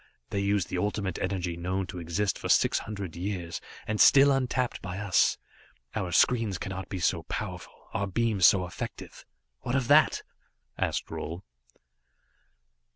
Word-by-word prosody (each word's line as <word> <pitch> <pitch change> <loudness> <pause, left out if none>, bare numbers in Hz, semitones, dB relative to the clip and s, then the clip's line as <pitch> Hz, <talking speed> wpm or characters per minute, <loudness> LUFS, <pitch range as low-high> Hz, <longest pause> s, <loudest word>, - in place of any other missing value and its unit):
They 100 - -1
use 100 -1 +1
the 90 - -3
Ultimate 100 -2 -2
Energy 90 -2 -2
known 90 +3 -2
to 90 - -7
exist 85 +4 -1
for - - -5
six - - +4
hundred 100 -6 -6
years, 90 -2 -4 0.2
and 110 0 0
still 140 0 +7
untapped 130 -2 0
by 95 -1 -5
us. 100 -3 +2 0.6
Our 95 -5 -2
screens 110 0 +3
cannot 95 +1 -6
be 95 - -4
so 85 -1 +1
powerful, - - -6
our 100 - -1
beams 105 -1 +3
so 95 -2 +3
effective. 90 - -8 0.3
What 120 - -3
of 135 -3 +1
that?" 150 +2 +5 0.5
asked - - -1
Roal. 85 +4 -5
95 Hz, 150 wpm, -28 LUFS, 90-105 Hz, 0.6 s, still